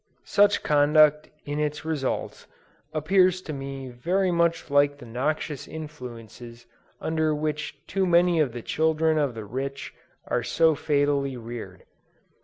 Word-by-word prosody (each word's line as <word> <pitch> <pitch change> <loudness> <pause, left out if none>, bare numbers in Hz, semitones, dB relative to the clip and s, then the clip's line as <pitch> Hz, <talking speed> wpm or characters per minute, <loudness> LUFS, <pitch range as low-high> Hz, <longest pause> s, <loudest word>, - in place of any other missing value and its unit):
Such 205 0 +3
conduct 150 +1 +4 0.2
in 145 +1 -3
its 150 0 -2
results, 150 -5 -3 0.4
appears 185 +4 +3
to 155 - -6
me 135 -1 -6
very 180 +10 0
much 170 -3 0
like 145 0 +3
the 125 - -12
noxious 140 +4 -3
influences 120 -6 -9 0.3
under 160 -1 0
which 150 0 -3
too 195 -1 0
many 175 -1 +4
of 145 -5 +2
the 120 -1 -7
children 160 0 +1
of 140 -5 0
the 110 -2 -6
rich 135 +5 -5 0.3
are - - 0
so 160 -1 +3
fatally 145 -3 0
reared. 115 -6 -8
150 Hz, 135 wpm, -25 LUFS, 135-160 Hz, 0.4 s, conduct